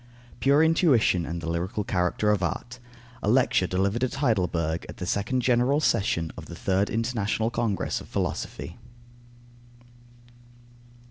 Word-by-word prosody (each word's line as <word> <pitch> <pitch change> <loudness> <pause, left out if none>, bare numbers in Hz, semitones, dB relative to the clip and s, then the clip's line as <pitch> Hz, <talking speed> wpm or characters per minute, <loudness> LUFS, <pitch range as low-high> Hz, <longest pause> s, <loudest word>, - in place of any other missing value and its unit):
PURE 140 +3 +4
INTUITION 145 - +3
AND 85 +1 -4
THE 85 - -4
LYRICAL 90 +5 -2
CHARACTER 90 +3 +1
OF 105 -3 +1
ART. 120 +8 -3 0.4
_A 105 - +1
Lecture 125 -7 +3
delivered 100 +6 0
at 130 - -1
Heidelberg 90 - 0
at - - -9
the 90 - -4
second 105 +8 0
general 125 +4 +3
session 85 - +1
of - - -9
the - - -8
Third 95 +2 0
International 115 -1 -1
Congress 110 -6 -1
of - - -12
Philosophy. - - -4
105 Hz, 135 wpm, -26 LUFS, 90-125 Hz, 0.4 s, PURE